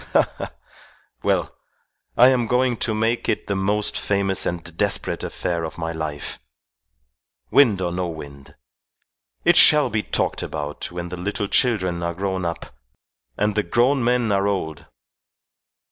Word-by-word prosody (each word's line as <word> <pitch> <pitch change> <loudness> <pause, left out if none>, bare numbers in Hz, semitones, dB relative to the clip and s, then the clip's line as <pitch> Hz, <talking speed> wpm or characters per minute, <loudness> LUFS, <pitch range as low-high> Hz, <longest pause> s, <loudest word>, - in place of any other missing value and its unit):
Ha! - - +4
ha! - - -5 0.7
Well, - - 0 0.6
I 125 +2 +8
am 125 -3 +1
going 125 +1 +2
to 110 0 0
make 115 +2 0
it - - -1
the 100 - -2
most 100 +2 0
famous 100 -1 0
and 85 -1 -5
desperate - - 0
affair 85 -1 -3
of 80 - -6
my 80 -1 -3
life 80 -3 -5 1.1
wind 115 -9 +5
or 90 - -1
no 90 0 -2
wind. 70 -4 -10 0.9
It - - +6
shall 150 -5 +6
be 105 0 +1
talked - - -1
about 75 +1 -5
when 85 0 -5
the 90 - -6
little 100 +3 -2
children 95 -8 +1
are 85 0 -2
grown 95 -1 -2
up 85 -6 -5 0.6
and 105 +1 +1
the 105 - +2
grown 120 +8 +2
men 120 -2 +2
are 100 0 +2
old. 80 -7 -3
95 Hz, 150 wpm, -22 LUFS, 85-115 Hz, 1.1 s, I